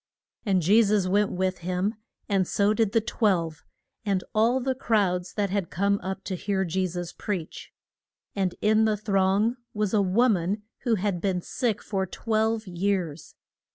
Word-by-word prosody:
And 190 Hz, -3 st, +2 dB
Je 205 Hz, +8 st, +6 dB
sus 205 Hz, -3 st, +2 dB
went 205 Hz, +2 st, +2 dB
with 185 Hz, 0 st, -1 dB
him, 185 Hz, +4 st, -1 dB, 0.3 s
and 195 Hz, -3 st, +1 dB
so 205 Hz, +1 st, +2 dB
did 220 Hz, -2 st, +1 dB
the 225 Hz, -, +3 dB
twelve, 175 Hz, -, 0 dB, 0.4 s
and 195 Hz, -3 st, 0 dB
all 230 Hz, +4 st, +3 dB
the 260 Hz, +1 st, 0 dB
crowd 200 Hz, -8 st, +1 dB
that 200 Hz, -3 st, 0 dB
had 195 Hz, -4 st, -1 dB
come 200 Hz, +2 st, +1 dB
up 190 Hz, +1 st, -5 dB
to 190 Hz, -, -4 dB
hear 190 Hz, +1 st, -1 dB
Je 185 Hz, +2 st, 0 dB
sus 175 Hz, 0 st, -5 dB
preach. 185 Hz, -6 st, -5 dB, 0.6 s
And 190 Hz, -3 st, 0 dB
in 215 Hz, +1 st, +4 dB
the 215 Hz, -1 st, +1 dB
throng 200 Hz, +3 st, +1 dB, 0.2 s
was 210 Hz, -1 st, 0 dB
a 210 Hz, -, +4 dB
wo 200 Hz, +6 st, +3 dB
man 200 Hz, 0 st, 0 dB, 0.2 s
who 235 Hz, -2 st, +3 dB
had 195 Hz, -3 st, -1 dB
been 190 Hz, -2 st, 0 dB
sick 225 Hz, -5 st, -2 dB
for 190 Hz, -2 st, -2 dB
twelve 220 Hz, +2 st, 0 dB
years. 175 Hz, -5 st, -2 dB
200 Hz, 170 wpm, -26 LUFS, 185-215 Hz, 0.6 s, Je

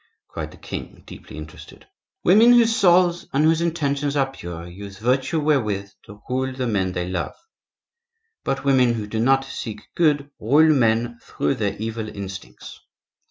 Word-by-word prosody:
cried -, -, -5 dB
the -, -, -15 dB
king, -, -, -8 dB
deeply -, -, -11 dB
interested. 75 Hz, 0 st, -11 dB, 0.4 s
"Women 220 Hz, +7 st, +7 dB
whose 230 Hz, -1 st, +5 dB
souls 175 Hz, -2 st, +3 dB
and 140 Hz, +2 st, +2 dB
whose 160 Hz, +1 st, +3 dB
intentions 145 Hz, -4 st, -1 dB
are 135 Hz, -2 st, +1 dB
pure 85 Hz, -8 st, -8 dB
use 100 Hz, +3 st, -10 dB
virtue 130 Hz, -, 0 dB
wherewith 105 Hz, -10 st, 0 dB
to 105 Hz, -1 st, -14 dB
rule 130 Hz, +1 st, -1 dB
the 130 Hz, 0 st, -3 dB
men 95 Hz, -5 st, 0 dB
they 90 Hz, 0 st, -3 dB
love; 90 Hz, -1 st, -3 dB, 1.1 s
but 135 Hz, -, -2 dB
women 130 Hz, -3 st, +4 dB
who 110 Hz, -2 st, -4 dB
do 110 Hz, +1 st, -4 dB
not 135 Hz, +3 st, +3 dB
seek 110 Hz, -5 st, -7 dB
good 145 Hz, -4 st, +1 dB
rule 150 Hz, +8 st, +5 dB
men 120 Hz, -2 st, +1 dB
through 70 Hz, -, -1 dB
their 105 Hz, -2 st, -2 dB
evil 110 Hz, 0 st, -4 dB
instincts. 100 Hz, -2 st, -9 dB
125 Hz, 160 wpm, -22 LUFS, 105-145 Hz, 1.1 s, Women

